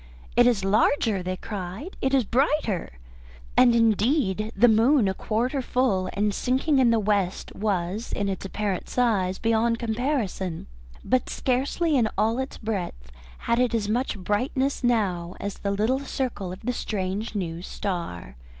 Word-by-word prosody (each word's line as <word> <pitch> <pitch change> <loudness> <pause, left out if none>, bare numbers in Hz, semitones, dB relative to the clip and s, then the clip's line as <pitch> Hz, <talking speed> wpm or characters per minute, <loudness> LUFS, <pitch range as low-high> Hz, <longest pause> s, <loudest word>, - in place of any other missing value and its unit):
"It 240 0 +6
is 215 -6 +2
larger," 215 0 +2
they 185 +1 -3
cried. 205 - -6
"It 265 - +1
is 270 -2 +3
brighter!" 240 - 0 0.6
And 240 -2 +6
indeed 220 - +2
the 245 - +6
moon, 230 +2 +4
a 190 - +1
quarter 240 +8 -1
full 235 -8 +1
and 205 +1 0
sinking 265 +5 +1
in 250 -2 +5
the 230 - +4
west, 200 -3 -1
was 200 +1 -2
in 200 - -1
its 195 -1 -3
apparent 195 -1 -3
size 200 -7 +1
beyond 230 +1 +1
comparison, 220 - -2 0.4
but 255 0 +1
scarcely 280 +5 0
in 230 -5 +3
all 225 +3 +2
its 265 +1 -4
breadth 180 - -4 0.3
had 235 +1 +2
it 250 -2 +2
as 210 -3 0
much 235 +1 -1
brightness 255 +8 -1
now 190 -7 0
as 200 -1 -5
the 200 - -2
little 215 +7 +1
circle 250 -9 -3
of 185 - -9
the 250 +2 -2
strange 205 0 -3
new 170 -4 -3
star. 170 - -5
220 Hz, 155 wpm, -25 LUFS, 190-250 Hz, 0.6 s, It